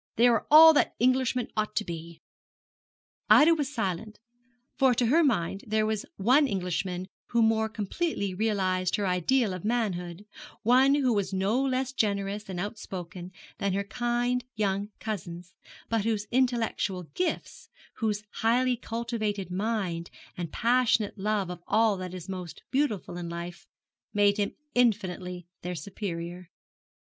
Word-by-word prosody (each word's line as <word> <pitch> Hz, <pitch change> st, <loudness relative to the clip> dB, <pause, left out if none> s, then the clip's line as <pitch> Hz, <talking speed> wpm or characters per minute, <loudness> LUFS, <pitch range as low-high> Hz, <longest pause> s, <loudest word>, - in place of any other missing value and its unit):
They 235 Hz, -, +4 dB
are 235 Hz, -2 st, +2 dB
all 320 Hz, +2 st, +10 dB
that 290 Hz, -, +2 dB
Englishmen 255 Hz, -1 st, +2 dB
ought 215 Hz, 0 st, -1 dB
to 215 Hz, -, 0 dB
be.' 165 Hz, -1 st, -8 dB, 1.1 s
Ida 315 Hz, +3 st, +8 dB
was 295 Hz, -4 st, -2 dB
silent, 215 Hz, -3 st, -3 dB, 0.6 s
for 265 Hz, -2 st, +4 dB
to 240 Hz, -, +2 dB
her 315 Hz, +9 st, +4 dB
mind 195 Hz, -, 0 dB
there 215 Hz, 0 st, +1 dB
was 215 Hz, -1 st, -2 dB
one 255 Hz, +9 st, +4 dB
Englishman 180 Hz, -3 st, -2 dB, 0.2 s
who 235 Hz, -1 st, +2 dB
more 220 Hz, 0 st, +2 dB
completely 215 Hz, -, -2 dB
realised 185 Hz, -3 st, 0 dB
her 205 Hz, -, -1 dB
ideal 190 Hz, +5 st, +1 dB
of 185 Hz, -, -6 dB
manhood 200 Hz, -5 st, -2 dB, 0.4 s
one 260 Hz, +4 st, +5 dB
who 260 Hz, -4 st, +2 dB
was 200 Hz, -2 st, -1 dB
no 195 Hz, +7 st, +1 dB
less 260 Hz, 0 st, -1 dB
generous 200 Hz, -2 st, -1 dB
and 180 Hz, -2 st, -4 dB
outspoken 185 Hz, -3 st, -6 dB, 0.3 s
than 200 Hz, -1 st, 0 dB
her 200 Hz, +1 st, 0 dB
kind 240 Hz, +3 st, -1 dB
young 200 Hz, -1 st, -1 dB
cousins, 180 Hz, -4 st, -6 dB, 0.3 s
but 225 Hz, -2 st, 0 dB
whose 215 Hz, -2 st, -1 dB
intellectual 235 Hz, -7 st, 0 dB
gifts, 360 Hz, -1 st, -3 dB, 0.3 s
whose 210 Hz, -3 st, -1 dB
highly 245 Hz, +3 st, +2 dB
cultivated 225 Hz, -5 st, -3 dB
mind, 190 Hz, -4 st, -2 dB, 0.3 s
and 170 Hz, -3 st, -5 dB
passionate 235 Hz, -3 st, +2 dB
love 200 Hz, -2 st, 0 dB
of 175 Hz, -1 st, -8 dB
all 220 Hz, -1 st, +3 dB
that 185 Hz, 0 st, -6 dB
is 180 Hz, -2 st, -8 dB
most 180 Hz, -3 st, -7 dB
beautiful 245 Hz, -10 st, -1 dB
in 175 Hz, -1 st, -5 dB
life, 170 Hz, 0 st, -7 dB, 0.5 s
made 205 Hz, 0 st, +4 dB
him 205 Hz, -1 st, -1 dB, 0.2 s
infinitely 185 Hz, -7 st, 0 dB, 0.2 s
their 180 Hz, 0 st, -4 dB
superior. 175 Hz, -2 st, -6 dB
210 Hz, 140 wpm, -28 LUFS, 185-240 Hz, 1.1 s, all